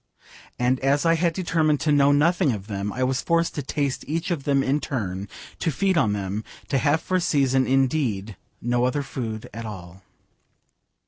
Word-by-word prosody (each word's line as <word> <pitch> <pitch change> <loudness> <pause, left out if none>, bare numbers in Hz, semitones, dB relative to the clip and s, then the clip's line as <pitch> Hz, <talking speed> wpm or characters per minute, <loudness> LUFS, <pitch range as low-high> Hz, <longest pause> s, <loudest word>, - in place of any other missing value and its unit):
And 125 +1 +1
as 140 +3 +1
I 165 - +5
had 170 +1 +2
determined 160 -4 +1
to 155 - +1
know 145 -1 +5
nothing 155 0 +3
of 100 -3 -6
them, 100 -1 -3
I 130 - -2
was 130 0 0
forced 170 0 +1
to 145 - -3
taste 140 0 -2
each 165 +5 -2
of 150 -6 -2
them 140 -1 +2
in 140 +3 +1
turn, 100 -9 -3 0.3
to 165 - 0
feed 190 +6 +1
on 130 -10 +3
them, 100 +1 -3 0.3
to 135 - +2
have 150 +4 +2
for 185 - 0
a - - 0
season, 135 -5 +2
indeed, 130 -7 +1 0.3
no 120 +1 +1
other 140 +3 0
food 115 -4 -5
at 115 +2 -6
all. 95 -3 -9
135 Hz, 190 wpm, -24 LUFS, 110-155 Hz, 0.3 s, I